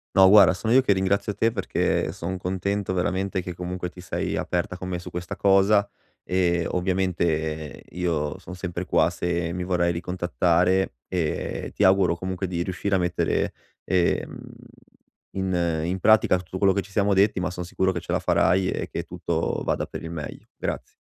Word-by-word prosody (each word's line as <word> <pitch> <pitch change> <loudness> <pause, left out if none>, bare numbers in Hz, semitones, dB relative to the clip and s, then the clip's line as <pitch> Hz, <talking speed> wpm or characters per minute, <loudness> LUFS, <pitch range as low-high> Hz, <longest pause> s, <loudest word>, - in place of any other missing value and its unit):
No 95 0 +8
guarda, 100 -3 +8
sono 110 +5 -1
io 130 - +7
che 105 -6 +2
ringrazio 100 +2 0
te 115 0 +1
perché 95 -5 0
son 95 0 -4
contento 95 +2 -2
veramente 95 +1 -1
che 90 -1 -6
comunque 90 0 -4
ti 90 - -13
sei 90 - -3
aperta 90 +1 -2
con 90 - -6
me 90 -1 -2
su 90 0 -9
questa 90 0 -5
cosa, 100 +1 +4 0.4
e 85 -2 +1
ovviamente 85 -4 -1
io 85 -2 -2
son 90 -1 -10
sempre 90 0 -5
qua 85 - +3
se 85 -1 -2
mi 90 0 -3
vorrei 85 -1 +1
ricontattare. 90 0 +1
E 85 -5 -2
ti 100 - +1
auguro 95 -2 +4
comunque 95 +1 -3
di 85 -1 -2
riuscire 95 +2 -2
a - - +4
mettere, 90 0 0 0.3
ehm, 90 -2 0 0.9
in 85 -4 -1
in 90 +2 -1
pratica 105 -2 +5
tutto 90 +1 -8
quello 95 -1 +4
che 100 - 0
ci 100 - -16
siamo 100 0 +2
detti, 100 +1 +3
ma 90 0 -1
sono 90 -1 -6
sicuro 95 +1 0
che 85 - -3
ce - - -5
la - - +2
farai 95 0 +2
e - - -3
che - - -4
tutto - - -2
vada - - -1
per - - -8
il 80 - -6
meglio. 75 -3 -7
Grazie. - - -5
90 Hz, 180 wpm, -25 LUFS, 85-95 Hz, 0.9 s, No